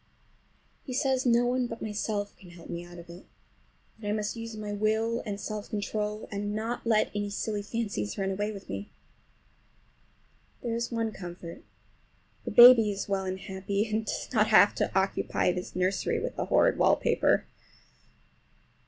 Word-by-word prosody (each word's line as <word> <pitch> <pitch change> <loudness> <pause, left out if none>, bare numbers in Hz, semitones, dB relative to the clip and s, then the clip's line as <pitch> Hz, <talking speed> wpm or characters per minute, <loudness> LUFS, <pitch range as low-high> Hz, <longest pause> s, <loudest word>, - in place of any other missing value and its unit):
He 255 - -5
says 265 -1 +1
no 240 0 +4
one 250 0 +1
but 230 -1 -7
myself 210 -1 -3
can 185 - -15
help 175 -1 -11
me 170 0 -4
out 175 0 -12
of 170 0 -11
it, 170 +2 -12 0.7
that 210 - -7
I - - 0
must 210 +1 -2
use 230 -1 -7
my 210 -1 -4
will 220 +3 0
and 200 -1 -3
self 210 0 -5
control 210 0 -3
and 205 +1 -3
not 230 +2 -3
let 220 -2 +3
any 205 0 -2
silly 205 +1 -3
fancies 205 - -3
run 195 0 -1
away 205 +2 -2
with 200 -2 -10
me. 100 +1 -6 1.7
There's 235 0 -2
one 230 -1 -1
comfort, 175 -3 -9 0.8
the - - -2
baby 240 -3 +9
is 200 -1 -3
well 195 -1 -1
and 190 0 -3
happy, 195 +2 -2
and 220 0 -1
does - - -3
not 215 -2 +4
have 215 -2 +6
to - - -1
occupy 190 -1 0
this 180 0 -6
nursery 185 +2 0
with - - -4
the - - -2
horrid - - +3
wallpaper. - - +3
210 Hz, 165 wpm, -28 LUFS, 195-225 Hz, 1.7 s, baby